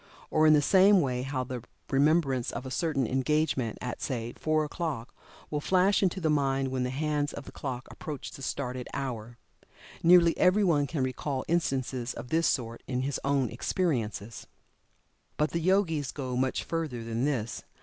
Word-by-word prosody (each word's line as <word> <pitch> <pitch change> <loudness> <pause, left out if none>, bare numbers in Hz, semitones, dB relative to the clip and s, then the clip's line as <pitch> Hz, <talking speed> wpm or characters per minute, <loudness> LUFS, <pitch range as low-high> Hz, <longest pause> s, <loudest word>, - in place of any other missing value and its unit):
Or, 155 0 +4
in 155 - +7
the 145 -1 +4
same 195 +3 +6
way 125 -5 0
how 130 0 -2
the 125 -1 -5 0.3
remembrance 140 -3 +2
of 120 +3 -5
a 130 - -6
certain 140 -2 0
engagement 130 -2 0
at, 125 - -5
say, 120 -3 -3
four 155 0 +1
o'clock, 150 -7 -4 0.4
will 150 -1 -1
flash 190 +4 +3
into 190 -1 +1
the 165 - 0
mind 135 -2 +1
when 130 0 -2
the 125 - 0
hands 145 +2 -1
of 140 - -7
the - - -10
clock 130 -2 -5
approach 150 -4 -6
the - - -11
stated 125 -2 -3
hour. 120 -4 -4 0.6
Nearly 170 0 +6
every 185 +3 +4
one 150 -6 +3
can 140 -1 -1
recall 130 +1 -2
instances 130 -7 -1
of 125 - -8
this 165 +1 +2
sort 115 -3 -1
in 125 -1 -1
his 140 0 -2
own 140 -3 +1
experience. 115 - -2 0.9
But 150 0 +1
the 170 - -1
Yogis 165 -5 +1
go 130 -3 -4
much 130 +1 0
further 155 -8 -3
than 115 +2 -1
this. 120 -6 -2
135 Hz, 175 wpm, -29 LUFS, 125-155 Hz, 0.9 s, in